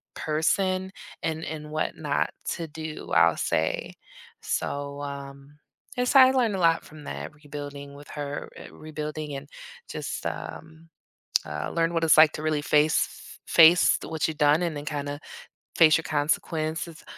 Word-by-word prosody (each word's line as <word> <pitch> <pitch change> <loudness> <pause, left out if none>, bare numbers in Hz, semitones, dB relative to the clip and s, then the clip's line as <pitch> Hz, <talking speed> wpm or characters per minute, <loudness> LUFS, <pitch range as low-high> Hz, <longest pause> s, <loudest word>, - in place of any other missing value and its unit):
person 185 +4 0 0.3
and 160 0 -2
and 150 -1 -6
what 155 0 -2
not 150 -2 -1
to 170 - -3
do, 160 0 -7
I'll - - +5
say. 80 0 -1 0.5
So, 140 0 -3
um, 140 0 -8 0.4
yes, 250 +2 0
I 260 -1 +9
learned 240 -6 +1
a - - -3
lot 165 -2 +3
from 150 -1 -13
that, - - -6
rebuilding 145 -1 -8
with 145 +1 -13
her, 145 -1 -5
uh, - - -11
rebuilding 155 -1 -6
and 135 +1 -7 0.4
just, - - -5
um, 160 +1 -7 0.6
uh, 75 0 -4
learned 165 0 +1
what 165 -1 0
it's 160 - +5
like 155 -1 +8
to - - -5
really 155 -1 0
face 150 +1 +1
f - - -7
face 170 +1 +7
what 160 -1 -1
you 160 - -3
done 150 +2 +3
and 170 -3 -1
then 145 0 -6
kinda 145 -1 -4 0.6
face 155 -2 +6
your 165 - -5
consequences, 155 +2 -2
155 Hz, 155 wpm, -26 LUFS, 145-165 Hz, 0.6 s, I